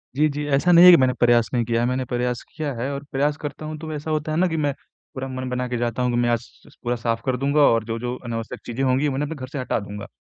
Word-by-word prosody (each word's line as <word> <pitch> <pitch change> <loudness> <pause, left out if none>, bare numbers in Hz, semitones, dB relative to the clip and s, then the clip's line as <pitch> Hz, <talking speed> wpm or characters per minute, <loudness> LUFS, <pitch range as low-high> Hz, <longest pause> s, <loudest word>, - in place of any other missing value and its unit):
जी, 150 +3 +3
जी। 145 +1 -4
ऐसा 180 +6 +3
नहीं 175 +1 +8
है 180 - +11
कि 175 - +8
मैंने 130 -2 +3
प्रयास 120 -1 +4
नहीं 120 -2 +2
किया 115 0 0
है, 120 - +1
मैंने 130 +1 -1
प्रयास 125 0 -2
किया 150 -3 -3
है 125 +3 -3
और 140 0 -5
प्रयास 145 +2 0
करता 155 0 -6
हूँ 155 0 -5
तो 160 0 -6
ऐसा 150 +1 -4
होता 155 0 -1
है 155 - -1
ना 185 +2 +3
कि 165 -2 -2
मैं 145 -2 0 0.4
पूरा 130 0 -4
मन 130 -1 -5
बना 125 0 -2
के 125 0 -2
जाता 120 +1 -2
हूँ 125 0 +1
कि 120 - 0
मैं 120 0 +2
आज 120 -1 +2 0.3
स - - -19
पूरा 120 0 0
साफ 115 -1 -2
कर 130 -2 0
दूँगा 140 +3 +2
और 115 -5 +4
जो-जो 115 +2 -3
अनावश्यक 115 +1 -5
चीज़ें 120 +3 -3
होंगी, 130 +2 +2
उन्हें 140 0 -1
अपने 160 - -4
घर 130 -3 -7
से 140 +2 -6
हटा 125 - -1
दूँगा। 100 0 -8
130 Hz, 300 wpm, -23 LUFS, 120-145 Hz, 0.4 s, है